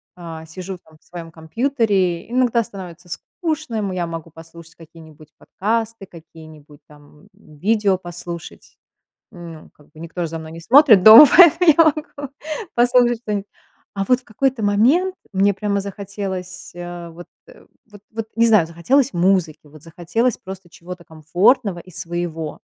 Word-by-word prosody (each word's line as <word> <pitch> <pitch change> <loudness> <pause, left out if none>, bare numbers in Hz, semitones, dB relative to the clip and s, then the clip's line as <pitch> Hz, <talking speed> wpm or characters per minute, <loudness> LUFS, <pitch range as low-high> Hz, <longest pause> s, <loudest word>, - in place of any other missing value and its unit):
а, 165 -2 -9
сижу 185 +3 -8
там 160 -2 -23
в - - -35
своем 170 -2 -10
компьютере, 190 - -1
иногда 245 -2 +1
становится 180 -5 -11
скучно, 310 - -5
м 200 -3 -2
я 180 -2 -3
могу 165 -1 -7
послушать 165 +1 -15
какие-нибудь 160 -2 -16
подкасты, 225 0 -3
какие-нибудь 155 -4 -16
там, 150 0 -20
м, 150 - -20
видео 205 +1 +1
послушать, 175 -1 -10 0.5
ну 170 -5 -12
как 150 - -24
бы. 155 - -17
Никто 170 +1 -6
же 165 - -2
за 165 0 -6
мной 160 0 -10
не 165 - -10
смотрит 235 - +6
дома, 225 +8 +11
поэтому 345 -1 +7
я 330 - +7
могу 290 -2 -3 0.4
послушать 240 -1 +3
что-нибудь. 205 -2 -4 0.5
А 195 0 -2
вот 250 0 +3
в - - -26
какой-то 250 +1 -2
момент 265 - +2 0.2
мне 195 +1 +2
прямо 200 0 -2
захотелось, 195 -2 -7
э, 175 -1 -8
вот 175 +2 -12 0.7
вот 205 - -14
вот 225 0 -6
не 230 0 +4
знаю, 215 -8 +4
захотелось 240 +12 +1
музыки, 175 -4 0
вот 150 0 -16
захотелось 175 +9 -2
просто 190 -2 -11
чего-то 175 +1 -11
комфортного 175 - 0
и 185 - -15
своего. 170 -2 -5
185 Hz, 155 wpm, -19 LUFS, 165-225 Hz, 0.7 s, дома